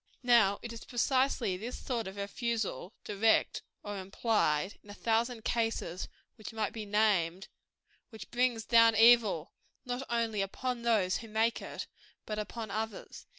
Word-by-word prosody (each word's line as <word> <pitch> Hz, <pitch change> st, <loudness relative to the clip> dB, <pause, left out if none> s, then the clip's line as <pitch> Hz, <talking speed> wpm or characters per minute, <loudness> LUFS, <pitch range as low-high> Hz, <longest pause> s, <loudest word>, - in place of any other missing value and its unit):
Now 225 Hz, -5 st, +5 dB
it 235 Hz, -1 st, -6 dB
is 230 Hz, -, -9 dB
precisely 255 Hz, -4 st, +1 dB
this 230 Hz, +6 st, -6 dB
sort 235 Hz, -5 st, -3 dB
of 190 Hz, -, -7 dB
refusal, 205 Hz, -, -3 dB
direct 215 Hz, +2 st, +2 dB, 0.2 s
or 205 Hz, -1 st, -5 dB
implied, 190 Hz, -3 st, 0 dB
in 205 Hz, -, -18 dB
a 205 Hz, -, -8 dB
thousand 230 Hz, +1 st, 0 dB
cases 225 Hz, -6 st, -1 dB, 0.3 s
which 215 Hz, -, -8 dB
might 215 Hz, -3 st, -2 dB
be 215 Hz, -2 st, -6 dB
named, 195 Hz, -4 st, +1 dB, 0.6 s
which 220 Hz, -3 st, -11 dB
brings 240 Hz, -2 st, +1 dB
down 230 Hz, -1 st, +6 dB
evil, 225 Hz, -7 st, +5 dB, 0.3 s
not 245 Hz, +1 st, -3 dB
only 230 Hz, -3 st, 0 dB
upon 245 Hz, +5 st, -3 dB
those 215 Hz, -6 st, +2 dB
who 225 Hz, -, -9 dB
make 220 Hz, +2 st, +1 dB
it, -, -, -6 dB, 0.4 s
but 215 Hz, 0 st, -3 dB
upon 215 Hz, 0 st, -5 dB
others. 220 Hz, 0 st, -5 dB
220 Hz, 150 wpm, -31 LUFS, 200-235 Hz, 0.6 s, down